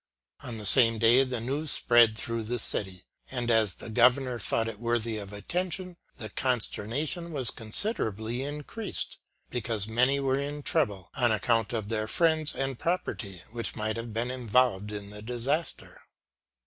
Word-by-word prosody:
On 115 - -6
the 105 - -6
same 115 +1 +7
day 115 +4 +5
the 130 -2 -3
news 140 +7 -2
spread 120 -4 +4
through 115 +1 -3
the 120 +3 -2
city, 95 -5 0 0.2
and 120 -2 -1
as 110 -5 +4
the 110 - -8
Governor 125 +1 +3
thought 115 0 0
it 110 -2 -6
worthy 115 -1 -1
of 100 -1 -8
attention, 180 - -3 0.2
the 110 - -6
consternation 130 - -2
was 135 -7 -1
considerably 110 - -1
increased; 150 +10 -2 0.3
because 110 -4 -2
many 125 +5 +2
were 135 0 +1
in 145 +1 -4
trouble 105 - 0
on 120 -3 +2
account 115 +1 +1
of 110 -4 -3
their 110 -1 -1
friends 160 +4 +2
and 135 -2 -2
property, 100 - -3
which 115 -4 -3
might 110 0 -1
have 115 0 -5
been 115 +3 -2
involved 120 -4 +1
in 100 -1 -6
the 105 0 -8
disaster. 125 +8 -3
120 Hz, 160 wpm, -28 LUFS, 110-135 Hz, 0.3 s, same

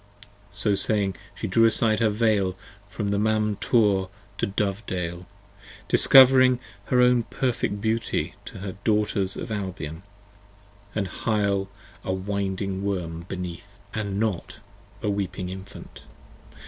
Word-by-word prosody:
45 100 - -16
So 105 - +2
saying, 100 -1 0 0.2
She - - -5
drew 115 +4 +4
aside 110 -1 +2
her 115 -2 +3
Veil 105 -4 +1 0.3
from 105 -1 -3
Mam 110 -1 +1
Tor 100 -6 +2 0.3
to - - +1
Dovedale, 95 -4 -3 0.6
Discovering 130 -1 +7 0.3
her 125 -1 +3
own 125 -1 +5
perfect 115 -4 -2
beauty 110 +1 -1
to - - -9
the 95 0 -5
Daughters 105 -3 +1
of - - -6
Albion 95 -6 -4 0.9
And 100 -3 0
Hyle 100 -1 0 0.3
a - - -2
winding 95 0 -2
Worm 85 -4 -3
beneath 90 +2 -7 0.2
and 100 -2 -2
not 105 -6 -2 0.5
a 105 - +1
weeping 95 -2 -3
Infant. 95 +1 -10
100 Hz, 120 wpm, -25 LUFS, 95-110 Hz, 0.9 s, Discovering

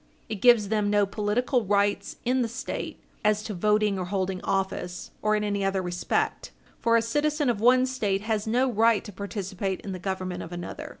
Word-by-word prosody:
It 210 -3 -4
gives 235 -5 +6
them 210 -1 +1
no 205 0 +4
political 220 +5 0
rights 200 0 +1
in 255 +1 +2
the 235 - +1
State 255 +5 -5 0.2
as 210 0 +2
to 215 - -4
voting 210 +1 +2
or 180 - -2
holding 190 0 -2
office, 190 -2 -2
or 215 0 +2
in 210 - 0
any 205 -1 -1
other 195 0 +1
respect. 175 0 -1 0.3
For 230 -1 +4
a 230 - +2
citizen 295 +2 +1
of 210 -3 -4
one 255 +2 +5
State 210 -7 -1
has 215 0 -1
no 250 +4 +2
right 225 0 +3
to 210 - -9
participate 195 -1 -3
in 195 - -6
the 185 - -5
government 185 -1 -3
of 165 - -8
another. 175 0 -6
210 Hz, 195 wpm, -27 LUFS, 195-230 Hz, 0.3 s, gives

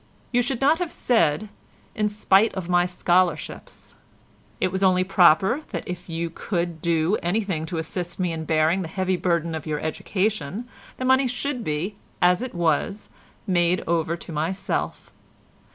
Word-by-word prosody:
You 245 0 +3
should 245 +1 -2
not 300 +5 +4
have 355 -3 -2
said 210 -4 +1 0.4
'in 210 -1 0
spite 210 +1 +3
of 185 -3 -4
my 175 0 +3
scholarships.' 180 -1 -1 0.7
It 185 - +1
was 190 +1 -2
only 185 -1 +4
proper 190 - +4
that - - -5
if 180 -1 -6
you 165 0 -3
could 170 -2 -3
do 170 +4 +1
anything 175 -3 -1
to 175 - -4
assist 170 +2 -4
me 180 -2 0
in 160 -1 -4
bearing 160 +4 +2
the 175 - -4
heavy 185 +2 -1
burden 170 -2 0
of 160 -1 -5
your 150 -1 -1
education, 200 +5 -2 0.3
the 255 - -3
money 260 +1 +4
should 250 0 -3
be, 175 +5 -3 0.2
as 180 +2 +4
it 255 -5 -5
was, 175 +4 0 0.4
made 175 -1 +2
over 165 0 0
to 170 - -10
myself. 165 +5 -3
180 Hz, 160 wpm, -24 LUFS, 165-210 Hz, 0.7 s, not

